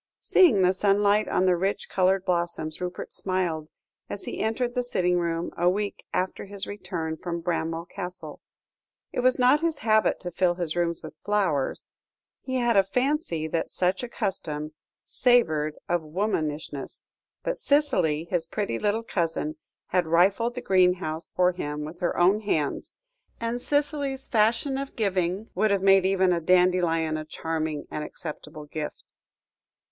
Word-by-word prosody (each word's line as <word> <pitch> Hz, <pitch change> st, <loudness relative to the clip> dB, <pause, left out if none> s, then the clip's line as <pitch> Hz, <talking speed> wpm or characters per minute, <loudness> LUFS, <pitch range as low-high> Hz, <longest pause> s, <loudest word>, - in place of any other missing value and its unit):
Seeing 245 Hz, -, +5 dB
the 180 Hz, +1 st, +4 dB
sunlight 205 Hz, +2 st, +3 dB
on 185 Hz, -, +1 dB
the 180 Hz, -1 st, +4 dB
rich 190 Hz, +3 st, -1 dB
coloured 190 Hz, 0 st, +2 dB
blossoms, 170 Hz, -3 st, -2 dB
Rupert 180 Hz, 0 st, -5 dB
smiled, 175 Hz, -5 st, -2 dB, 0.4 s
as 200 Hz, -, -5 dB
he -, -, -5 dB
entered 240 Hz, +3 st, -1 dB
the 250 Hz, -, +1 dB
sitting 180 Hz, -7 st, +1 dB
room 170 Hz, 0 st, -2 dB
a 175 Hz, +1 st, +3 dB
week 205 Hz, +2 st, -2 dB
after 185 Hz, +2 st, -2 dB
his 200 Hz, 0 st, -4 dB
return 175 Hz, -5 st, -4 dB
from 170 Hz, 0 st, -4 dB
Bramwell 165 Hz, -1 st, -2 dB
Castle. 180 Hz, -1 st, -7 dB, 0.7 s
It -, -, -3 dB
was 255 Hz, +1 st, +3 dB
not 255 Hz, +3 st, +5 dB
his 325 Hz, -1 st, 0 dB
habit 220 Hz, -1 st, +3 dB
to 180 Hz, -, -5 dB
fill 175 Hz, 0 st, +2 dB
his 175 Hz, -3 st, -2 dB
rooms 170 Hz, -1 st, -1 dB
with 155 Hz, -, -10 dB
flowers: 195 Hz, -10 st, 0 dB, 0.5 s
he 260 Hz, -, -4 dB
had 240 Hz, -2 st, +2 dB
a 195 Hz, -, +7 dB
fancy 250 Hz, -, -1 dB
that 165 Hz, +1 st, -1 dB
such 185 Hz, +1 st, 0 dB
a 245 Hz, -, -5 dB
custom 155 Hz, -9 st, -3 dB, 0.3 s
savoured 160 Hz, -12 st, +2 dB
of 175 Hz, -1 st, +1 dB
womanishness; 155 Hz, -5 st, -3 dB, 0.4 s
but -, -, -2 dB
Cicely, 180 Hz, -, +2 dB
his 170 Hz, -1 st, -2 dB
pretty 200 Hz, -, -2 dB
little 210 Hz, +2 st, 0 dB
cousin, 165 Hz, -6 st, -2 dB, 0.3 s
had 180 Hz, -2 st, +1 dB
rifled 195 Hz, +9 st, +3 dB
the 250 Hz, -, -4 dB
greenhouse 180 Hz, -5 st, +2 dB
for 180 Hz, 0 st, +3 dB
him 150 Hz, -4 st, -4 dB
with 165 Hz, +3 st, -9 dB
her 175 Hz, -, -1 dB
own 185 Hz, +4 st, +4 dB
hands, 160 Hz, -9 st, -2 dB, 0.4 s
and 235 Hz, +1 st, -2 dB
Cicely's 285 Hz, -2 st, -1 dB
fashion 230 Hz, +4 st, +1 dB
of 275 Hz, 0 st, -6 dB
giving 190 Hz, -1 st, -1 dB
would 215 Hz, +4 st, +2 dB
have 200 Hz, -1 st, +1 dB
made 195 Hz, -1 st, +6 dB
even 190 Hz, -1 st, +3 dB
a 170 Hz, -, -1 dB
dandelion 175 Hz, -2 st, +3 dB
a 155 Hz, -, -4 dB
charming 155 Hz, -1 st, -3 dB
and 150 Hz, -, -3 dB
acceptable 150 Hz, -2 st, -8 dB
gift. 150 Hz, 0 st, -6 dB
185 Hz, 155 wpm, -26 LUFS, 165-210 Hz, 0.7 s, a